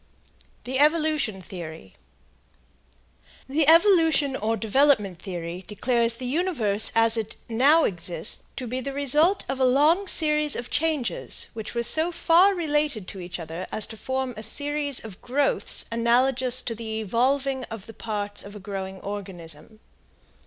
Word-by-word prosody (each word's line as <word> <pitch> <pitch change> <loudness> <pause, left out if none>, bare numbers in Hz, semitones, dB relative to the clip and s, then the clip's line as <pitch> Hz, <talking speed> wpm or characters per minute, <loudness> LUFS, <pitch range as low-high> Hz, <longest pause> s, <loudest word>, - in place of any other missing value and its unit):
THE 260 +2 -3
EVOLUTION 300 - +1
THEORY. 160 - -9 1.5
The 285 +2 +1
evolution 325 -5 +4
or 225 -1 -1
development 220 - +2
theory 175 -1 -6
declares 235 +2 0
the 255 - -6
universe 250 - +2
as 225 0 +3
it 220 -1 -4
now 275 +8 +4
exists 170 -3 0
to 255 - -5
be 250 +2 -4
the 275 +2 -5
result 300 +7 +3
of 265 0 -3
a - - +2
long 300 +10 +3
series 300 -3 +3
of 240 - -6
changes 310 -6 0
which 220 +1 -7
were 235 - 0
so 320 +8 +2
far 355 +4 +4
related 295 - -1
to 195 - -9
each 175 0 -7
other 165 +2 -7
as 215 - +1
to 220 - -9
form 260 +2 -3
a 215 - -7
series 285 +4 -1
of 200 -5 -10
growths 275 +3 +1
analogous 250 +2 +1
to 230 - -3
the 220 -1 -5
evolving 260 +5 0
of 225 -3 -9
the 225 - -11
parts 205 -2 -5
of 200 +1 -12
a - - -8
growing 190 -1 -6
organism. 195 -1 -7
245 Hz, 150 wpm, -25 LUFS, 205-290 Hz, 1.5 s, evolution